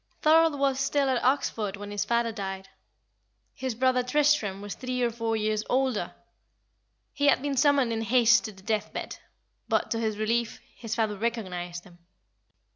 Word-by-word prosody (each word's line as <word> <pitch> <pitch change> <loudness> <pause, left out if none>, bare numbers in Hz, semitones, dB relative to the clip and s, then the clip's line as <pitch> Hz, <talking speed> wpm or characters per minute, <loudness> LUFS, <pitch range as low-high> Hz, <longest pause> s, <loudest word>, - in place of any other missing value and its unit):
Thorold 320 -1 +5
was 275 -1 +1
still 275 0 +1
at 250 - 0
Oxford 225 -6 0
when 205 0 -8
his 205 0 -2
father 235 +1 +1
died. 195 -2 -6 0.8
His 260 -3 -4
brother 255 +1 +2
Tristram 250 -6 +1
was 205 0 -6
three 255 -1 -3
or 235 - +1
four 230 0 -2
years 215 0 -1
older. 260 -4 0 1.0
He 285 0 +1
had 285 - +4
been 285 -1 -1
summoned 275 -4 +3
in 225 - -2
haste 235 +1 +4
to 215 - -5
the 190 -2 -17
death 215 0 -1
bed; - - -6 0.5
but, - - 0
to 225 - 0
his 220 -2 -1
relief, 230 +2 -1 0.2
his 225 -2 -5
father 220 -2 0
recognised 185 -6 -4
him. 175 -2 -18
230 Hz, 170 wpm, -27 LUFS, 210-260 Hz, 1.0 s, Thorold